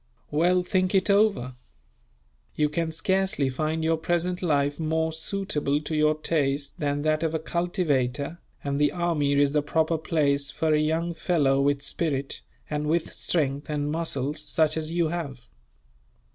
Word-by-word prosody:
"Well, 180 +4 +3
think 185 +1 +1
it 190 +1 +3
over. 200 - +2 1.0
You 150 -1 +2
can 165 +1 -1
scarcely 190 -3 +1
find 155 +4 -2
your 165 0 +2
present 175 +2 -1
life 145 -4 +1
more 160 0 0
suitable 160 -4 -1
to 155 +1 -4
your 155 0 +3
taste 145 -3 -1
than 145 -1 -1
that 155 0 +1
of 165 -1 0
a - - +3
cultivator, 155 -3 -1 0.2
and 140 0 -1
the 145 - +4
army 165 -5 +1
is 140 0 +3
the 150 0 +2
proper 160 +2 0
place 140 -3 +1
for 160 -1 0
a 150 - +4
young 160 +3 0
fellow 145 -5 +2
with 140 0 +1
spirit, 140 -2 -1 0.3
and 150 0 -2
with 165 +1 0
strength 145 -3 -1
and 145 -1 -1
muscles 150 -3 -2
such 155 0 +1
as 160 0 -3
you 170 -1 +1
have. 140 -7 -5
155 Hz, 160 wpm, -26 LUFS, 145-170 Hz, 1.0 s, the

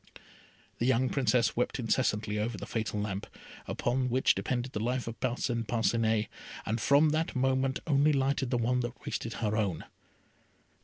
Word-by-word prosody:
The 120 - +1
young 130 0 +3
Princess 125 -3 +2
wept 125 - 0
incessantly 110 -3 0
over 110 +1 -2
the - - -6
fatal 110 -2 -2
lamp, 100 -1 -3 0.4
on 125 +1 0
which 130 +2 +3
depended 125 0 -2
the 105 - -3
life 125 +3 -1
of 115 - -6
Parcin 120 -2 -1
Parcinet, 115 -1 +1 0.4
and 110 +2 -1
from 145 +5 +5
that 155 +1 -1
moment 130 0 +1
only 145 0 +4
lighted 135 -2 +1
the 125 - +1
one 120 +2 +1
that 120 +2 -4
wasted 115 - -3
her 110 -2 -1
own. 100 -7 -1
120 Hz, 160 wpm, -30 LUFS, 110-130 Hz, 0.4 s, from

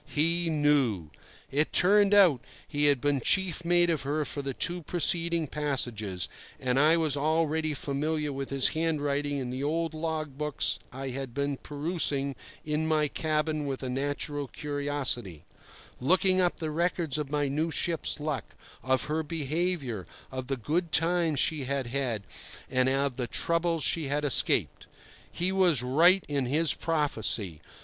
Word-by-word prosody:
He 165 +3 +1
knew. 140 - +1 0.4
It 150 +3 +1
turned 205 +2 +4
out 175 - +6 0.3
he 145 -1 0
had 145 -2 +4
been 145 -2 +1
chief 180 +3 +1
mate 175 0 +3
of 160 - -1
her 150 +2 -1
for 145 - -3
the 135 -2 -4
two 175 +1 -1
preceding 170 0 +1
voyages; 120 - -2 0.3
and 130 +1 +1
I 155 +3 +5
was 155 -4 +3
already 155 +1 0
familiar 150 +2 -2
with 135 0 -5
his 135 -1 +3
handwriting 145 -3 -1
in 125 -2 -4
the 130 +2 -4
old 165 +2 -1
log 155 -3 -4
books 150 -1 0
I 135 +1 -5
had 130 -1 -6
been 140 0 -1
perusing 145 -2 -1 0.3
in 155 +1 -1
my 155 -2 +2
cabin 155 -1 -1
with 135 -1 -4
a 130 - -3
natural 145 +2 -3
curiosity, 140 - -3 0.5
looking 185 +6 +3
up 175 -1 +1
the 160 -2 -3
records 165 -2 -1
of 150 -2 -4
my 145 -1 0
new 155 +4 -1
ship's 165 -1 -1
luck, 150 -2 -4 0.3
of 130 0 +1
her 155 +1 -1
behaviour, 155 - -2 0.2
of 130 -1 -5
the 135 0 -1
good 160 +8 -1
times 165 -2 +2
she 155 -4 +1
had 135 0 -2
had, 120 -4 -2 0.5
and 130 0 +2
of 135 -1 0
the 125 -2 -2
troubles 170 +3 0
she 160 -4 0
had 145 +2 -1
escaped. 140 - +2 0.4
He 180 +2 0
was 180 -9 +3
right 170 +9 +4
in 140 -3 -1
his 155 +5 +3
prophecy. 110 - -1
150 Hz, 155 wpm, -28 LUFS, 135-165 Hz, 0.5 s, out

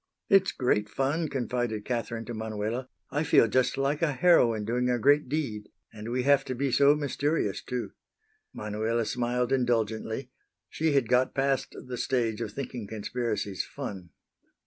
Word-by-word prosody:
"It's 195 -1 +5
great 105 -5 0
fun," 145 +7 0
confided 120 -5 -2
Catherine 115 -2 -3
to 120 - -6
Manuela. 110 +3 -3 0.2
"I 145 +3 0
feel 145 - +5
just 130 +5 +1
like 140 +3 0
a 160 -4 +2
heroine 120 -10 +4
doing 125 +3 0
a 125 - +2
great 145 +3 +3
deed. 125 -9 -3 0.2
And 110 +1 -7
we 125 +1 0
have 140 0 +4
to 130 - -3
be 135 +1 -1
so 140 +3 +5
mysterious, 145 -5 -1
too." 125 -1 -4 0.6
Manuela 110 +2 -2
smiled 125 +2 -1
indulgently. 115 0 -1 0.4
She 160 -1 0
had 135 -4 +2
got 125 +2 +2
past 135 -1 0
the 125 -1 -5
stage 120 -4 0
of 110 -3 -3
thinking 125 -3 -6
conspiracies 110 -2 -3
fun. 95 -4 -7
125 Hz, 155 wpm, -28 LUFS, 110-135 Hz, 0.6 s, It's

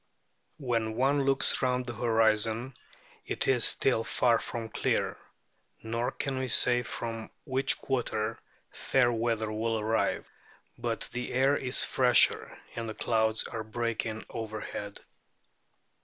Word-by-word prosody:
When 115 -5 -1
one 135 +3 +2
looks 135 0 +3
round 125 -1 0
the 120 - -5
horizon 115 +1 +1 0.5
it - - -2
is 125 -3 +4
still 125 -4 +3
far 115 0 +2
from 115 -2 -5
clear; - - -1 0.7
nor 115 +2 -2
can 135 -2 -3
we 130 - -2
say 120 0 +3
from 115 -1 -5
which 135 -1 +1
quarter 115 -4 -2 0.3
fair 125 -2 +1
weather 115 -2 -1
will 110 +1 -1
arrive. 110 +1 0 0.5
But - - -3
the 125 0 -4
air 135 +3 +3
is 130 -2 +2
fresher, 125 -2 +3 0.2
and 115 -1 -4
the 110 - -6
clouds 110 -1 0
are 115 -1 -5
breaking 110 0 -3
overhead. 110 -2 -6
115 Hz, 125 wpm, -29 LUFS, 110-125 Hz, 0.7 s, is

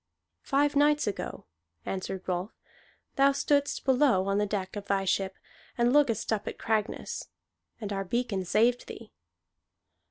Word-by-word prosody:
"Five 290 +1 +1
nights 295 +1 +4
ago," 205 - -4 0.4
answered 190 0 -4
Rolf, 180 +3 -3 0.6
"thou 275 +1 +5
stoodst 285 0 +1
below 255 -7 +4
on 200 +1 +1
the 210 - +1
deck 195 -2 -3
of 205 -1 -5
thy 195 -1 +1
ship, 190 0 0 0.4
and 240 +1 +3
lookedst 245 -8 +2
up 210 - -3
at - - -4
Cragness. 215 -1 -2 0.5
And 210 -3 -4
our 195 0 -2
beacon 205 -1 -1
saved 230 +7 +2
thee." 225 -1 -10
215 Hz, 140 wpm, -29 LUFS, 195-270 Hz, 0.6 s, thou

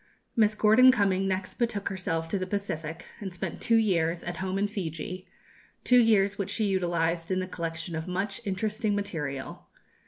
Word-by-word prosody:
Miss 215 -2 +3
Gordon 220 +5 +7
Cumming 195 -5 +1
next 190 0 -3
betook 230 -4 0
herself 165 -4 -2
to 200 - -1
the 185 - -3
Pacific, 165 -5 -4
and 200 -3 -5
spent 175 - -5
two 230 - +3
years 175 -6 +2
"at 175 - -5
Home 190 0 -2
in 200 - +2
Fiji;" 185 -2 -5 0.6
two 250 0 +6
years 205 -3 +3
which 200 -1 -2
she 215 +1 0
utilized 170 -3 0
in 185 -1 +1
the 185 - -1
collection 165 -2 -4
of 160 +2 -4
much 195 +3 -3
interesting 210 +1 -1
material. 150 -9 -4
190 Hz, 175 wpm, -28 LUFS, 170-205 Hz, 0.6 s, Gordon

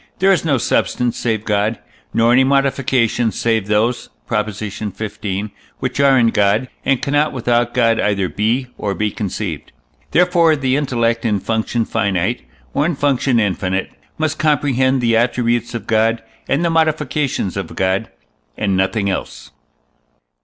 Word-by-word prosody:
there 190 +2 +4
is 190 - +2
no 145 -5 +2
substance 120 0 0
save 110 -2 -2
God, 105 +1 0 0.3
nor 115 +1 +3
any 130 +2 +5
modifications 130 -4 +1
save 110 -4 0
those 110 +4 0 0.2
(Prop. 105 -2 0
xv.) 105 -1 -5 0.3
which 130 +1 -3
are 140 -1 +5
in 115 -2 +4
God, 105 +3 +1
and 135 -2 +2
cannot 145 +2 +1
without 120 -1 0
God 115 -2 +3
either 100 -2 +1
be 115 +7 0
or 100 -2 -2
be 105 +3 -1
conceived. 100 -4 -4 0.4
Therefore 170 -2 +4
the 135 -3 0
intellect, 115 -5 0
in 105 -4 +1
function 115 +2 -1
finite, 100 +1 -1 0.3
or 140 - +1
in 170 - -1
function 135 -3 +1
infinite, 95 -2 -1 0.3
must 155 -1 -1
comprehend 135 -4 +2
the 115 -1 +2
attributes 120 0 0
of 115 - -5
God 115 +1 +1 0.3
and 145 +6 +1
the 170 - +1
modifications 150 - 0
of 100 -4 -5
God, 95 +3 0 0.5
and 100 -3 0
nothing 95 +2 0
else. 95 - -4
115 Hz, 145 wpm, -18 LUFS, 105-135 Hz, 0.5 s, any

